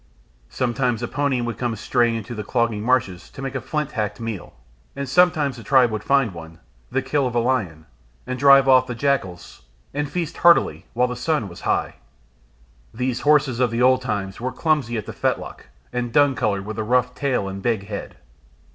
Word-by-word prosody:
Sometimes 125 - -1
a - - -1
pony 140 -2 0
would 120 -3 -4
come 120 -2 -1
straying 120 +1 +1
into 115 +2 -5
the 105 -2 -5
clogging 115 -1 0
marshes 115 -7 0
to - - -14
make 135 -1 -4
a 130 - -3
flint 150 -1 -3
hacked 105 -4 -3
meal, 115 -4 -6 0.4
and 140 0 -4
sometimes 150 -3 +3
the 115 - -10
tribe 125 -2 +4
would 105 -1 -4
find 135 -6 +2
one, 80 -1 -10 0.3
the - - -1
kill 145 -3 0
of 120 - -5
a - - +3
lion, 105 -11 -1 0.4
and 130 0 -4
drive 140 -1 +7
off 130 -1 +5
the 125 - -4
jackals, 115 -10 -2 0.3
and 145 0 -2
feast 165 -2 -3
heartily 170 0 +4
while 125 +2 +2
the 125 - -5
sun 125 -2 -1
was 85 -2 -11
high. - - 0 0.9
These 125 +1 -2
horses 145 -5 +3
of 125 -2 +3
the 115 +2 0
old 130 0 +4
time 100 -6 -3
were 130 +2 -3
clumsy 145 -8 0
at 110 - -4
the - - -7
fetlock - - -3 0.3
and 120 -1 -2
dun 145 +1 +4
coloured, 105 -6 -1
with 110 +1 -5
a - - 0
rough 125 +2 +1
tail 130 -8 -1
and 95 0 -6
big 110 -3 -1
head. 100 -1 -7
125 Hz, 200 wpm, -22 LUFS, 110-135 Hz, 0.9 s, drive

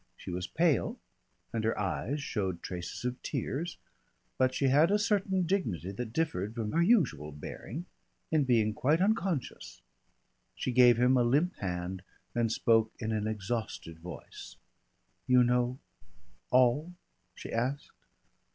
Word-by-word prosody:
She - - -7
was 90 +1 -3
pale, 165 -5 +1 0.6
and 115 -1 -1
her 110 - 0
eyes 130 +8 -2
showed 95 -9 -2
traces 90 +6 -5
of 125 0 -3
tears, 165 +5 -3 0.6
but 130 -1 +3
she 135 - -1
had 150 +6 +5
a 205 - +4
certain 195 -3 +1
dignity 110 - -1
that 110 +3 -5
differed 115 - -1
from 110 -3 -2
her 170 - +2
usual 170 - +2
bearing 115 - -7 0.5
in 155 -2 +3
being 110 -4 +3
quite 150 +9 +2
unconscious. 190 - -1 0.7
She 130 - -2
gave 125 -1 +6
him 125 +2 +4
a 125 - +4
limp 145 +10 +2
hand 90 -1 -3 0.3
and 115 -2 +1
spoke 115 -1 +3
in 110 -2 -3
an 110 -1 -1
exhausted 110 -6 -4
voice. 90 +1 -10 0.7
"You 125 -1 +6
know 125 +1 +1 0.7
all?" 130 +7 +3 0.4
she - - -8
asked. 130 +5 -2
125 Hz, 140 wpm, -31 LUFS, 105-150 Hz, 0.7 s, gave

